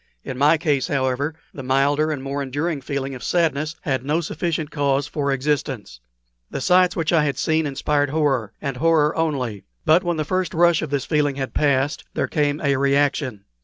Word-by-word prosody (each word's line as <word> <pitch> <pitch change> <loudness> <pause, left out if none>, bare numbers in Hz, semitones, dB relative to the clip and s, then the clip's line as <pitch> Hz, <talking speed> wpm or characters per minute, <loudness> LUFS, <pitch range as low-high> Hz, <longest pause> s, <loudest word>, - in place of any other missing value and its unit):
In 130 - -5
my 145 +5 +4
case, 150 -4 0
however, 140 0 -1 0.2
the 135 - -7
milder 140 +4 +2
and 145 -4 -3
more 140 +1 -3
enduring 145 +3 -2
feeling 135 0 -3
of 125 -3 -8
sadness 155 -2 0
had 130 -4 -1
no 150 +4 +1
sufficient 160 -1 -3
cause 140 -2 +1
for 145 -1 -2
existence. 135 - -2 0.5
The - - -4
sights 180 +4 +3
which 165 -1 0
I 160 -3 +4
had 140 -3 -1
seen 160 +1 +1
inspired 145 +1 0
horror, 135 -8 0
and 135 -2 -4
horror 155 0 +3
only. 130 -11 -2 0.2
But 165 +3 +5
when 175 -2 -1
the 155 - -1
first 185 +2 -1
rush 170 0 +4
of 155 - -4
this 140 -1 -1
feeling 150 -3 +1
had 135 -1 -4
passed 140 0 +1
there - - 0
came 145 -2 0
a 140 -2 +2
reaction. 140 -5 +1
145 Hz, 190 wpm, -22 LUFS, 135-155 Hz, 0.5 s, But